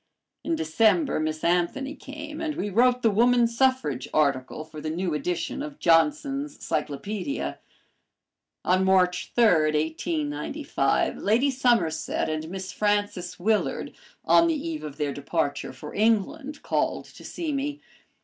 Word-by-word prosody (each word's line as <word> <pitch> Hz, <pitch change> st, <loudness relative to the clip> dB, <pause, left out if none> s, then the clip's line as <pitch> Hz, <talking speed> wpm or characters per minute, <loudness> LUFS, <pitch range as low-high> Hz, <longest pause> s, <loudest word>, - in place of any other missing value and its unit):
In 330 Hz, -, 0 dB
December 290 Hz, -, +2 dB
Miss 155 Hz, 0 st, -2 dB
Anthony 180 Hz, +12 st, +1 dB
came, 300 Hz, +2 st, -8 dB
and 310 Hz, -2 st, -2 dB
we 205 Hz, +2 st, -3 dB
wrote 245 Hz, +4 st, +3 dB
the 225 Hz, -, +4 dB
woman 240 Hz, +3 st, +4 dB
suffrage 235 Hz, -, +1 dB
article 140 Hz, -1 st, +1 dB
for 155 Hz, -1 st, -10 dB
the 155 Hz, -, -3 dB
new 170 Hz, +1 st, -2 dB
edition 175 Hz, -, -2 dB
of 295 Hz, -1 st, -6 dB
Johnson's 280 Hz, -, +2 dB
Cyclopedia. 185 Hz, -, -3 dB, 1.1 s
On 185 Hz, +1 st, +3 dB
March 180 Hz, -1 st, +2 dB
3, 240 Hz, -, +5 dB
1895, 155 Hz, -, 0 dB
Lady 240 Hz, +7 st, +2 dB
Somerset 240 Hz, -, +1 dB
and 155 Hz, 0 st, -3 dB
Miss 190 Hz, +1 st, -5 dB
Frances 205 Hz, -4 st, -1 dB
Willard, 215 Hz, +4 st, 0 dB, 0.3 s
on 335 Hz, -, +5 dB
the 325 Hz, -, +1 dB
eve 315 Hz, +1 st, -4 dB
of 150 Hz, -2 st, -7 dB
their 145 Hz, -2 st, -1 dB
departure 145 Hz, 0 st, -2 dB
for 150 Hz, -, -10 dB
England, 230 Hz, +8 st, 0 dB
called -, -, -1 dB
to -, -, -15 dB
see 325 Hz, -3 st, -4 dB
me. 285 Hz, +1 st, -2 dB
205 Hz, 135 wpm, -26 LUFS, -, 1.1 s, 3